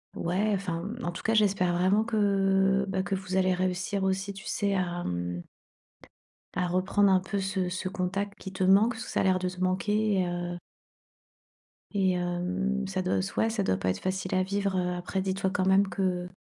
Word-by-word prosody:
Ouais, 195 +5 0
enfin, 185 0 -3
en 175 - -1
tout 170 - -7
cas, 225 0 +1
j'espère 195 -4 +3
vraiment 190 +4 +3
que, 195 -3 +2
bah, 190 -1 -1
que 190 - -3
vous 185 -1 -3
allez 185 0 +3
réussir 185 +2 -1
aussi, 190 +1 -1
tu 195 +1 -11
sais, 200 -1 0
à 175 -2 -1
mmh 90 0 -3 1.1
à 180 - +1
reprendre 185 +3 +2
un 185 - +5
peu 190 +2 -3
ce 190 -1 -1
ce 185 +1 -3
contact, 195 +2 -3
qui 190 - -7
te 190 0 -2
manque. 200 +6 +5
Ça, 225 - -3
a - - +1
l'air 185 -1 +3
de 185 0 -1
manquer, 195 +1 +1
heu 175 0 -3 1.4
et 190 -2 +2
hem, 180 +3 -1
ça 190 -1 -2
doit 185 0 0
soi 200 - 0
ouais 225 - +1
ça 220 -3 -1
doit 95 - +1
pas 95 0 -1
être 95 - -1
facile 185 0 -2
à 185 - +3
vivre, 200 0 -1
heu, 180 0 0
après 180 +2 -3
dis-toi 190 0 -1
quand 185 -1 0
même 190 +1 +4
que 180 -2 -1
190 Hz, 195 wpm, -28 LUFS, 180-200 Hz, 1.4 s, un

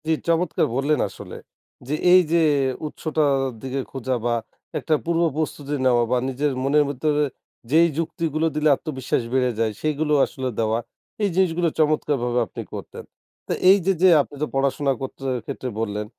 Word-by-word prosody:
জি, - - +2 0.2
চমৎকার 170 0 +1
বললেন 145 +3 +1
আসলে! - - -10 0.5
যে, 145 - -2 0.2
এই 185 0 +8
যে 170 0 +4 0.5
উৎসটার 150 -2 0 0.2
দিকে 135 +1 -3
খোঁজা 130 -1 -2
বা 120 - +2 0.5
একটা 155 - +1
পূর্ব 170 0 +1
প্রস্তুতি 150 -2 -3
নেওয়া 120 -2 +4
বা 125 - +3
নিজের 140 +3 -1
মনের 145 +2 +4
ভিতরে 150 +2 0 0.5
যেই 165 +3 +6
যুক্তিগুলো 165 -1 -1
দিলে 155 0 +2
আত্মবিশ্বাস 130 -5 -3
বেড়ে 125 -1 +2
যায় 115 -1 +1
সেগুলো 155 0 0
আসলে 130 -1 -4
দেওয়া। 110 0 +1 0.4
এই 205 - +3
জিনিসগুলো 175 -2 +2
চমৎকারভাবে 145 -5 +1
আপনি - - -7
করতেন। - - -8 0.4
তো - - 0 0.2
এই 195 - +8
যে, 195 - +3
যে 185 - +7
আপনি 145 - -9
তো - - 0
পড়াশোনা 135 +1 +1
করতে 135 0 -7 0.2
ক্ষেত্রে 130 -2 -5
বললেন 105 -1 -2
145 Hz, 160 wpm, -23 LUFS, 130-160 Hz, 0.5 s, এই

